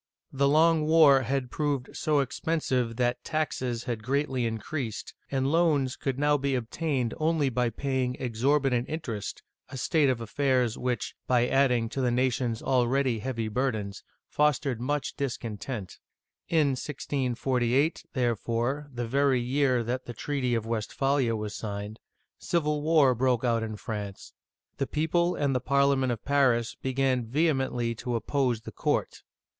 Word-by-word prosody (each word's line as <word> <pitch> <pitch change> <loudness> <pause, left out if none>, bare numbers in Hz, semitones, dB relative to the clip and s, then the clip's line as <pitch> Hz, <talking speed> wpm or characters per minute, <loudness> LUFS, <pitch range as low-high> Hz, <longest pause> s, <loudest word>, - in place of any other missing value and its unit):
The 140 +1 +2
long 155 +1 +4
war 155 -4 +6
had 130 0 -2
proved 145 -4 -2
so 150 -2 +2
expensive 130 -4 -1
that 125 0 0
taxes 130 -6 -2
had 115 -3 -3
greatly 130 0 0
increased, 115 +1 -4 0.2
and 135 0 0
loans 150 -6 +2
could 135 -2 -3
now 145 +1 +2
be 135 0 0
obtained 125 0 -1
only 155 -3 +1
by 125 -1 0
paying 130 -1 -1
exorbitant 130 +1 +1
interest, 120 -11 -5 0.3
a 135 - -7
state 145 +2 +2
of 125 -3 0
affairs 125 0 +1
which, 125 -1 -2
by 125 -1 +3
adding 125 -4 +2
to 135 - -3
the 125 - +2
nation's 125 -2 0
already 130 -1 +2
heavy 115 -1 -3
burdens, 110 -4 -2 0.2
fostered 145 -4 +1
much 145 +3 -2
discontent. 120 -5 -5 0.5
In 155 -4 +3
1648, 130 0 0
therefore, 120 +3 -1
the 120 -2 -4
very 135 +1 +2
year 130 0 +1
that 125 +3 -3
the 120 - -5
treaty 130 0 -1
of 115 -1 -2
Westphalia 115 +2 0
was 105 -1 -4
signed, 105 0 -5 0.4
civil 150 -3 0
war 150 -4 +4
broke 125 0 +1
out 115 -2 +2
in 110 -1 -4
France: 105 -1 -6 0.4
the 135 - -1
people 170 +3 +1
and 140 -2 0
the 125 - +1
Parliament 140 0 +2
of 115 - -5
Paris 130 -5 +2
began 130 -1 0
vehemently 130 -4 0
to 120 +1 -4
oppose 125 -1 0
the - - -9
court. - - -1
130 Hz, 145 wpm, -28 LUFS, 120-140 Hz, 0.5 s, war